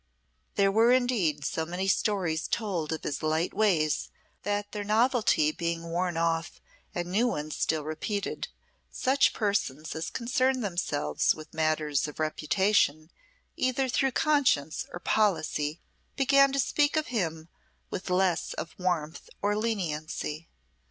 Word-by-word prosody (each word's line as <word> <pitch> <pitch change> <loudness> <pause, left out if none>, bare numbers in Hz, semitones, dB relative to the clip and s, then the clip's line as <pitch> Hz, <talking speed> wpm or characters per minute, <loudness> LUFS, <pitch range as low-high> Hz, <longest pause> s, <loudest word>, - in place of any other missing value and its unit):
There 195 -1 +3
were 225 +4 +5
indeed 215 - +2
so 160 - -1
many 180 +4 -3
stories 185 -5 +1
told 180 -9 -2
of 160 - -3
his 145 - -3
light 155 +2 0
ways, 170 -8 +1 0.3
that 205 +1 -2
their 210 -1 -4
novelty 215 - +3
being 170 +1 -3
worn 175 0 -1
off 165 0 -1 0.4
and 175 0 -3
new 225 +6 +3
ones 155 -8 -3
still 155 -1 0
repeated, 175 +7 -3 0.4
such 270 +2 +2
persons 180 - -1
as 160 +1 -3
concerned 255 +1 0
themselves 175 -6 0
with 155 -1 -11
matters 155 -2 +1
of 150 - -10
reputation 155 0 +1 0.4
either 260 +1 +1
through 265 +1 +1
conscience 275 - +2
or 175 - -6
policy, 165 -7 +1 0.4
began 275 0 +5
to 275 - -1
speak 290 +3 +2
of 310 - +1
him 165 -7 -2 0.4
with 185 - -4
less 180 -1 +1
of 165 - -5
warmth 175 -3 -2
or 205 +1 +1
leniency. 165 -7 -3
180 Hz, 135 wpm, -28 LUFS, 155-220 Hz, 0.4 s, were